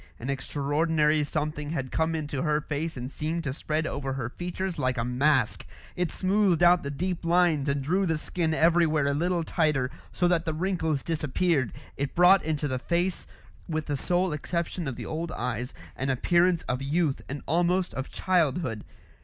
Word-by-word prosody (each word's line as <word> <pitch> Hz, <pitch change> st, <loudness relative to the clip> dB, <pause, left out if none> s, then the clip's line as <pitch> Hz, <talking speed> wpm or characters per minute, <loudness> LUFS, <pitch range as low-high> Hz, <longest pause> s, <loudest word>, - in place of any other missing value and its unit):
An 125 Hz, +4 st, -3 dB
extraordinary 150 Hz, +3 st, +1 dB
something 150 Hz, -1 st, -3 dB
had 135 Hz, -5 st, -3 dB
come 160 Hz, 0 st, +1 dB
into 145 Hz, -4 st, -3 dB
her 150 Hz, -1 st, +2 dB
face 155 Hz, +1 st, -3 dB
and 125 Hz, +2 st, -5 dB
seemed 160 Hz, +3 st, -2 dB
to 140 Hz, -4 st, -2 dB
spread 155 Hz, +2 st, -2 dB
over 135 Hz, -2 st, -3 dB
her 125 Hz, -3 st, -3 dB
features 180 Hz, +4 st, -4 dB
like 130 Hz, 0 st, 0 dB
a 115 Hz, -, 0 dB
mask; 125 Hz, -1 st, +2 dB, 0.3 s
it 180 Hz, -1 st, -1 dB
smoothed 190 Hz, -3 st, +2 dB
out 175 Hz, 0 st, +6 dB
the 140 Hz, -, -4 dB
deep 175 Hz, +5 st, -3 dB
lines 170 Hz, -4 st, +3 dB
and 140 Hz, 0 st, 0 dB
drew 185 Hz, +6 st, +1 dB
the 160 Hz, -1 st, +1 dB
skin 160 Hz, +1 st, -1 dB
everywhere 160 Hz, -2 st, +3 dB
a 140 Hz, -, +2 dB
little 170 Hz, +3 st, 0 dB
tighter 150 Hz, -6 st, +1 dB, 0.2 s
so 175 Hz, -, +1 dB
that 175 Hz, -2 st, +2 dB
the 160 Hz, -2 st, -2 dB
wrinkles 160 Hz, -5 st, -1 dB
disappeared; 155 Hz, -3 st, 0 dB, 0.3 s
it 140 Hz, 0 st, -3 dB
brought 180 Hz, +3 st, +7 dB
into 150 Hz, -1 st, -1 dB
the 130 Hz, -2 st, -2 dB
face 175 Hz, +6 st, -1 dB, 0.4 s
with 155 Hz, -1 st, -1 dB
the 145 Hz, -, -1 dB
sole 175 Hz, +4 st, +1 dB
exception 170 Hz, +2 st, -3 dB
of 135 Hz, -, -3 dB
the -, -, -7 dB
old 160 Hz, +1 st, -3 dB
eyes 125 Hz, +1 st, -3 dB, 0.2 s
an 135 Hz, +1 st, -2 dB
appearance 170 Hz, +6 st, +3 dB
of 125 Hz, +2 st, -2 dB
youth 145 Hz, +1 st, 0 dB
and 145 Hz, +1 st, -5 dB
almost 175 Hz, +2 st, +1 dB
of 130 Hz, +1 st, -4 dB
childhood. 155 Hz, -, 0 dB
155 Hz, 180 wpm, -27 LUFS, 140-175 Hz, 0.4 s, brought